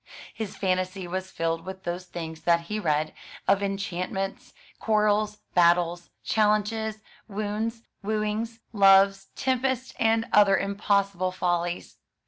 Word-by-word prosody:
His 215 Hz, -3 st, -6 dB
fantasy 185 Hz, -1 st, -1 dB
was 185 Hz, +1 st, -4 dB
filled 165 Hz, -1 st, -2 dB
with 190 Hz, 0 st, -8 dB
those 175 Hz, +1 st, -4 dB
things 160 Hz, -2 st, -7 dB
that 170 Hz, 0 st, +3 dB
he 210 Hz, +6 st, -4 dB
read, 155 Hz, -4 st, 0 dB, 0.3 s
of 195 Hz, 0 st, +4 dB
enchantments, 195 Hz, +3 st, -3 dB, 0.3 s
quarrels, 210 Hz, -1 st, +2 dB, 0.2 s
battles, 175 Hz, 0 st, +3 dB
challenges, 215 Hz, 0 st, +1 dB, 0.2 s
wounds, 215 Hz, +2 st, -3 dB, 0.2 s
wooings, 215 Hz, +2 st, -2 dB, 0.2 s
loves, 195 Hz, -1 st, +5 dB
tempests, 260 Hz, -1 st, -1 dB
and 225 Hz, 0 st, +3 dB
other 200 Hz, -2 st, +6 dB
impossible 200 Hz, -2 st, 0 dB
follies. 175 Hz, -1 st, -2 dB
195 Hz, 110 wpm, -26 LUFS, 180-215 Hz, 0.3 s, other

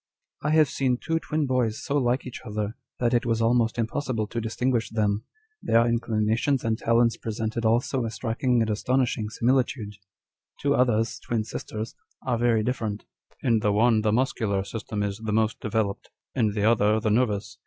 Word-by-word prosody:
" -, -, -54 dB
I 150 Hz, -, -1 dB
have 155 Hz, -1 st, +5 dB
seen 130 Hz, -2 st, 0 dB
two 165 Hz, +5 st, -1 dB
twin 155 Hz, -2 st, -1 dB
boys 125 Hz, -4 st, 0 dB
so 140 Hz, -, -1 dB
like 125 Hz, 0 st, 0 dB
each 125 Hz, -, -7 dB
other, 105 Hz, -1 st, -3 dB, 0.2 s
that 120 Hz, 0 st, +1 dB
it 120 Hz, +1 st, +3 dB
was 115 Hz, -2 st, 0 dB
almost 115 Hz, 0 st, +2 dB
impossible 115 Hz, -1 st, -1 dB
to 120 Hz, -, -3 dB
distinguish 115 Hz, +1 st, 0 dB
them. 105 Hz, -1 st, 0 dB, 0.4 s
Their 115 Hz, +1 st, +4 dB
incli 115 Hz, -2 st, 0 dB
nations 120 Hz, +5 st, +1 dB
and 115 Hz, -1 st, +1 dB
talents 115 Hz, +1 st, +2 dB
presented 110 Hz, +1 st, -3 dB
also 120 Hz, +3 st, +2 dB
a 115 Hz, -, -2 dB
striking 120 Hz, +2 st, 0 dB
and 110 Hz, -, -1 dB
astonish 125 Hz, +4 st, +1 dB
ing 105 Hz, -1 st, -3 dB
similitude. 120 Hz, -3 st, 0 dB, 0.6 s
Two 140 Hz, 0 st, +2 dB
others, 115 Hz, -4 st, +1 dB
twin 115 Hz, -2 st, -2 dB
sisters, 110 Hz, +1 st, -6 dB, 0.3 s
are 120 Hz, -3 st, 0 dB
very 115 Hz, -2 st, +3 dB
dif 125 Hz, +4 st, -1 dB
ferent: 105 Hz, -2 st, -3 dB, 0.4 s
in 115 Hz, -3 st, +3 dB
the 105 Hz, -1 st, +1 dB
one 110 Hz, +1 st, +3 dB
the 105 Hz, 0 st, +1 dB
muscular 110 Hz, -5 st, 0 dB
system 105 Hz, 0 st, -4 dB
is 100 Hz, 0 st, -3 dB
the 110 Hz, -1 st, -3 dB
most 110 Hz, 0 st, +1 dB
developed, 105 Hz, -2 st, -2 dB, 0.2 s
in 110 Hz, -5 st, +1 dB
the 105 Hz, -1 st, -1 dB
other 110 Hz, -1 st, +4 dB
the 110 Hz, -1 st, 0 dB
nervous. 105 Hz, -3 st, 0 dB
115 Hz, 185 wpm, -26 LUFS, 110-125 Hz, 0.6 s, have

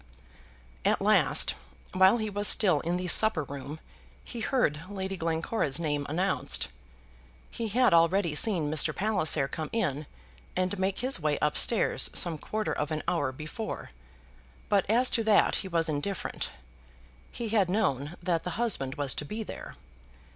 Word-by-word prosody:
At -, -, +2 dB
last, -, -, +3 dB, 0.4 s
while 190 Hz, +4 st, +5 dB
he 220 Hz, -2 st, -3 dB
was 205 Hz, +1 st, -2 dB
still 180 Hz, -8 st, +4 dB
in 170 Hz, +4 st, -2 dB
the 180 Hz, 0 st, -4 dB
supper 180 Hz, -2 st, +4 dB
room, 140 Hz, +2 st, -8 dB, 0.4 s
he 240 Hz, -, -8 dB
heard 220 Hz, -, 0 dB
Lady 195 Hz, -1 st, -4 dB
Glencora's 165 Hz, -2 st, -1 dB
name 145 Hz, -3 st, -2 dB
announced. 180 Hz, -, -1 dB, 0.8 s
He 230 Hz, -, -4 dB
had 245 Hz, 0 st, +3 dB
already 170 Hz, 0 st, +3 dB
seen 160 Hz, -3 st, +1 dB
Mr. 155 Hz, 0 st, +2 dB
Palliser 180 Hz, -9 st, +2 dB
come 155 Hz, +1 st, -5 dB
in 150 Hz, -10 st, -2 dB, 0.5 s
and 185 Hz, +2 st, -1 dB
make 190 Hz, 0 st, -1 dB
his 255 Hz, -4 st, 0 dB
way 150 Hz, -2 st, 0 dB
up 150 Hz, 0 st, 0 dB
stairs 230 Hz, -, +3 dB
some 165 Hz, -3 st, +2 dB
quarter 215 Hz, +6 st, -3 dB
of 150 Hz, -, -3 dB
an 155 Hz, -1 st, -3 dB
hour 145 Hz, -6 st, 0 dB
before; 155 Hz, -, -7 dB, 0.8 s
but 200 Hz, -2 st, +1 dB
as 245 Hz, +4 st, +3 dB
to 230 Hz, -, +1 dB
that 215 Hz, -2 st, +4 dB
he 195 Hz, -, -4 dB
was 170 Hz, -2 st, 0 dB
indifferent. 155 Hz, -, -3 dB, 0.8 s
He 235 Hz, -2 st, -5 dB
had 205 Hz, -4 st, +2 dB
known 150 Hz, -, -1 dB
that 170 Hz, -2 st, 0 dB
the 180 Hz, -, -5 dB
husband 185 Hz, -, 0 dB
was 145 Hz, -4 st, -1 dB
to -, -, -4 dB
be 215 Hz, +9 st, -5 dB
there. -, -, -9 dB
180 Hz, 155 wpm, -28 LUFS, 150-210 Hz, 0.8 s, while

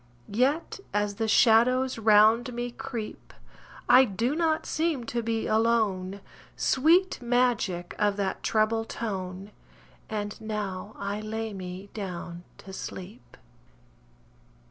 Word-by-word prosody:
Yet, 275 Hz, -, +1 dB, 0.2 s
as 205 Hz, -1 st, 0 dB
the 225 Hz, -, +1 dB
shadows 245 Hz, +3 st, +4 dB
round 220 Hz, +3 st, +5 dB
me 240 Hz, 0 st, -3 dB
creep, 240 Hz, -4 st, -7 dB, 0.5 s
I 255 Hz, +2 st, +8 dB
do 235 Hz, +5 st, -1 dB
not 320 Hz, -1 st, +1 dB
seem 315 Hz, -5 st, -1 dB
to 235 Hz, +1 st, -2 dB
be 225 Hz, 0 st, -2 dB
alone 215 Hz, -4 st, +1 dB, 0.3 s
Sweet 335 Hz, +5 st, +3 dB
magic 240 Hz, -8 st, 0 dB
of 205 Hz, -1 st, +2 dB
that 195 Hz, -2 st, -2 dB
treble 225 Hz, +1 st, +1 dB
tone 195 Hz, -3 st, -5 dB, 0.6 s
And 205 Hz, -1 st, -4 dB
"Now 210 Hz, -2 st, -4 dB
I 200 Hz, +1 st, -3 dB
lay 220 Hz, 0 st, -4 dB
me 185 Hz, +1 st, -8 dB
down 175 Hz, -4 st, -6 dB, 0.2 s
to 190 Hz, -, -9 dB
sleep!" 180 Hz, -, -9 dB
220 Hz, 115 wpm, -27 LUFS, 200-245 Hz, 0.6 s, I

